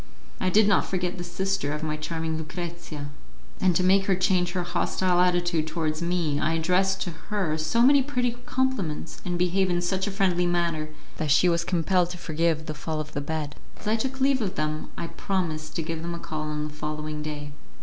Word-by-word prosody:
I 185 - +1
did 210 +2 +5
not 200 - +3
forget 180 -1 -2
the - - -3
sister 180 -3 -1
of 150 +1 -4
my 155 -1 -1
charming 160 +1 -3
Lucrezia, 160 -2 -5 0.5
and 185 -2 +3
to 185 - +3
make 195 +1 +4
her 195 - +4
change 180 -1 +2
her 180 -2 0
hostile 175 +1 +1
attitude 175 -3 +2
towards 155 -1 -1
me 170 -4 0
I 155 +2 +1
addressed 185 +4 +2
to 175 - -4 0.2
her 195 -8 0
so 160 +10 +2
many 280 +2 +7
pretty 250 -3 0 0.2
compliments, 245 -13 -1
and 175 -2 -1
behaved 180 +2 +2
in 175 -1 +2
such 185 +3 0
a - - -1
friendly 185 -3 +2
manner, 170 -3 0 0.3
that 155 - -1
she 150 +6 +5
was 170 -1 +2
compelled 175 +1 +2
to 180 - -6
forgive 160 -2 0
the 155 - -3
fall 155 +1 -3
of 155 0 -5
the 145 - -2
bed. 150 0 -3 0.2
As - - -13
I 215 - +3
took 265 +4 -2
leave 265 -1 +3
of 195 -4 -2
them, 155 0 -2
I - - -3
promised 165 -4 -2
to 165 - 0
give 165 0 -3
them 170 +1 -3
a - - -6
call 155 -2 -4
on 150 0 -2
the - - -12
following 150 0 -4
day. 150 -1 -5
175 Hz, 210 wpm, -26 LUFS, 155-185 Hz, 0.5 s, many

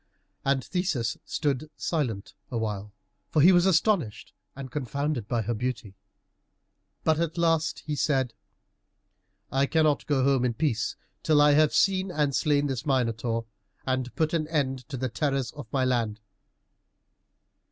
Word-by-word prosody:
And 135 -1 +1
Theseus 175 -11 -1
stood 145 0 -1
silent 120 - -2 0.2
awhile, 105 -3 -3 0.4
for 155 - +1
he 170 +6 +8
was 175 0 +5
astonished 175 - +1 0.2
and 135 -2 -8
confounded 140 -2 -2
by 115 -1 0
her 120 +3 -1
beauty. 115 -3 -4 1.1
But 160 -1 +2
at 170 0 -1
last 165 -1 +1
he 150 - -2
said, 135 -4 +1 1.2
"I 135 +1 +2
cannot 155 -2 +2
go 140 -3 +2
home 135 -2 +3
in 120 -2 0
peace 115 -7 0 0.3
till 155 -2 +3
I 145 0 +6
have 150 +1 +4
seen 190 0 +3
and 150 -5 0
slain 145 -2 +2
this 135 -3 -2
Minotaur, 115 -4 0 0.4
and 130 -1 -2
put 160 -1 0
an 155 -2 0
end 135 -5 -2
to 135 - -4
the 130 +1 -1
terrors 135 +2 -1
of 145 -5 -9
my 130 -2 +1
land." 115 -4 0
140 Hz, 145 wpm, -27 LUFS, 120-155 Hz, 1.2 s, he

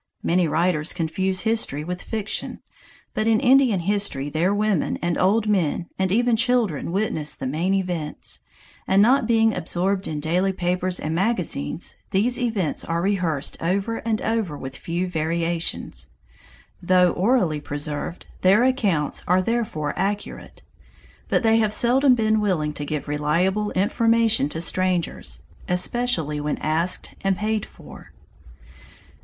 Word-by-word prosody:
Many 175 0 +2
writers 165 -1 +1
confuse 185 +3 -1
history 220 -10 -1
with 180 +2 -5
fiction, 215 -2 -4 0.5
but 215 - -1
in 225 -1 +4
Indian 255 -6 +4
history 195 -7 -1
their 170 +5 +1
women 205 -5 0
and 170 -1 -1
old 210 +4 +2
men 180 -4 0
and 190 -1 +1
even 240 +3 +3
children 230 - +1
witness 175 -6 -1
the - - -6
main 165 +9 0
events, 175 -6 -3 0.5
and 190 - +3
not 240 +3 +4
being 225 -1 +3
absorbed 185 +2 -1
in 150 -1 -3
daily 180 +5 +1
papers 180 0 -1
and 155 - -3
magazines, 175 - -1
these 235 +6 +1
events 220 -9 -1
are 165 0 -2
rehearsed 180 -8 -1
over 195 +6 0
and 220 -1 -2
over 220 -9 -1
with 130 -1 -7
few 175 +5 -3
variations. 165 0 -2 0.7
Though 180 0 +4
orally 185 - +1
preserved, 145 +3 -5 0.2
their 195 +6 +5
accounts 205 - 0
are 185 +1 +3
therefore 210 -10 -1
accurate. 200 +2 -4 0.6
But - - +1
they 225 0 +4
have 215 -1 +1
seldom 255 +3 +4
been 220 -2 +2
willing 160 -7 0
to 145 - -5
give 150 -1 -4
reliable 170 +8 0
information 225 -2 +2
to 160 - -4
strangers, 175 - -1 0.3
especially 180 -5 0
when 150 0 -2
asked 165 +4 -1
and 195 -1 +1
paid 215 0 -1
for. - - -14
185 Hz, 140 wpm, -23 LUFS, 160-215 Hz, 0.7 s, their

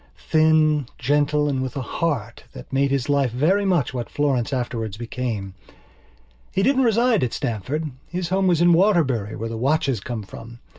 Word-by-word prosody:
Thin, 155 -3 +3
gentle, 145 +3 +1
and 135 -2 -1
with 130 -1 -4
a - - -2
"heart" 125 -8 -3
that 65 - -11
made 140 +1 +2
his 135 -3 -1
life 140 -3 +2
very 170 - +2
much 170 -10 +1
what 120 -2 -4
Florence's 140 -4 0
afterwards 115 -5 -3
became. 115 -5 -4 1.0
He 195 - 0
didn't 265 +3 +3
reside 230 - +3
at 120 - -1
Stamford; 140 +6 -3 0.2
his 180 -1 -4
home 190 +1 +1
was 170 -2 +2
in 175 0 +6
Waterbury 155 - +2
where 115 +2 -4
the 115 - -5
watches 140 -2 +1
come 110 +2 -5
from. 115 +4 -11
140 Hz, 170 wpm, -22 LUFS, 120-165 Hz, 1.0 s, in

